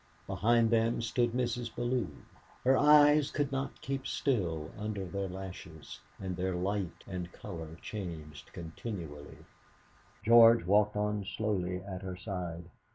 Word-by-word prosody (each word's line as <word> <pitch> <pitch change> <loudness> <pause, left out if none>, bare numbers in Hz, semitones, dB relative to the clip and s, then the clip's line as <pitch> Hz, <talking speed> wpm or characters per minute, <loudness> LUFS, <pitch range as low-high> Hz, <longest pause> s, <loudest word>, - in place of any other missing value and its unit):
Behind 115 +1 +2
them 115 0 +2
stood 120 +1 +1
Mrs. 120 -1 -2
Bellew. 120 -3 0 0.6
Her 130 +1 +5
eyes 150 0 +6
could 145 -1 -1
not 135 0 -3
keep 135 -1 -3
still 85 - -1
under 105 -2 -4
their 100 +1 -3
lashes, 90 -5 -8 0.2
and 95 -2 -4
their 90 +1 -1
light 95 -1 -2
and 90 -2 -5
colour 80 -1 -8
changed 80 -8 -7
continually. 80 -3 -7 0.9
George 115 -2 +7
walked 105 +2 +3
on 105 0 0
slowly 95 -3 -2
at 95 -2 -6
her 95 -2 -5
side. 90 -3 -5
100 Hz, 130 wpm, -32 LUFS, 90-120 Hz, 0.9 s, George